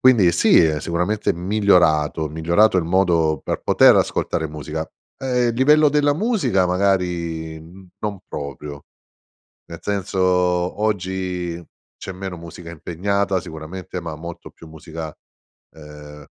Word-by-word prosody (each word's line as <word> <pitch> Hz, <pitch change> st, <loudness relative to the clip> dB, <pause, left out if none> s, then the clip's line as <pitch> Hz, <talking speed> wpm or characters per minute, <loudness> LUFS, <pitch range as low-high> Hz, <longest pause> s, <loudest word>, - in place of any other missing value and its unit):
quindi 110 Hz, -10 st, +5 dB
sì, 85 Hz, -, +5 dB
è 80 Hz, -2 st, +2 dB
sicuramente 90 Hz, +7 st, -1 dB
migliorato, 85 Hz, -5 st, +2 dB
migliorato 85 Hz, +7 st, +2 dB
il 90 Hz, -, +2 dB
modo 85 Hz, -4 st, +2 dB
per -, -, -3 dB
poter -, -, +6 dB
ascoltare 80 Hz, -, 0 dB
musica. 75 Hz, +1 st, -5 dB, 0.3 s
Ehm, 125 Hz, -2 st, +1 dB
il 115 Hz, -, -1 dB
livello 150 Hz, +5 st, +5 dB
della 145 Hz, 0 st, +2 dB
musica 155 Hz, -, +1 dB
magari, 90 Hz, -4 st, -1 dB
mhmm, 90 Hz, +4 st, -15 dB
non 105 Hz, -2 st, -3 dB
proprio. 70 Hz, 0 st, -7 dB, 0.8 s
Ne 85 Hz, -1 st, -9 dB
senso, 100 Hz, -2 st, -3 dB
oggi 90 Hz, -1 st, 0 dB, 0.4 s
c'è -, -, -7 dB
meno 95 Hz, -1 st, -6 dB
musica 85 Hz, 0 st, -10 dB
impegnata 95 Hz, +4 st, -1 dB
sicuramente, 85 Hz, +4 st, -7 dB
ma 80 Hz, -2 st, -6 dB
molto 85 Hz, +2 st, -9 dB
più 80 Hz, -, -15 dB
musica, 80 Hz, 0 st, -8 dB, 0.6 s
ehm, 75 Hz, -1 st, -12 dB
90 Hz, 125 wpm, -21 LUFS, 80-100 Hz, 0.8 s, poter